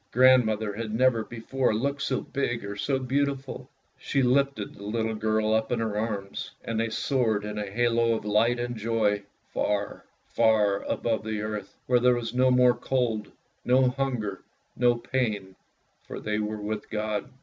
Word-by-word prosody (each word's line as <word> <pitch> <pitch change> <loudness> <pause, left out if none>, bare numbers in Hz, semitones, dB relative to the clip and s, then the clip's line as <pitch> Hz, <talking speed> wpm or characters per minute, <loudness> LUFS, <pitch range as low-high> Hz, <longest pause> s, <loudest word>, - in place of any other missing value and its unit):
Grandmother 110 -4 +4
had 110 +1 -4
never 115 0 +3
before 120 +1 -1
looked 140 +5 -1
so 135 -1 0
big 120 -5 -2
or 100 0 -5
so 135 +6 0
beautiful. 135 +1 -2 0.3
She 135 - 0
lifted 135 -3 +1
the 100 - -12
little 110 +2 -1
girl 110 0 +1
up 110 0 +1
in 120 - +1
her 110 -2 -1
arms, 105 -2 -3 0.2
and 115 -1 -2
they 115 0 0
soared 110 -3 0
in 105 0 -4
a 105 -1 -4
halo 115 +1 +2
of 110 - -5
light 115 +4 +2
and 120 0 -3
joy, 110 -2 +1 0.3
far, 105 0 -1 0.2
far 105 -3 +3
above 110 -2 -1
the 110 -1 -3
earth, 105 -2 -5
where 125 -1 +3
there 125 0 +4
was 120 -1 -4
no 130 +1 +4
more 125 -1 +5
cold, 120 -4 -1 0.3
no 130 +1 +4
hunger, 125 -7 -2 0.3
no 120 -1 +3
pain, 110 -6 -2 0.5
for - - -6
they 105 0 -2
were 105 0 -2
with 105 0 -4
God. 105 0 -2
115 Hz, 170 wpm, -27 LUFS, 105-125 Hz, 0.5 s, more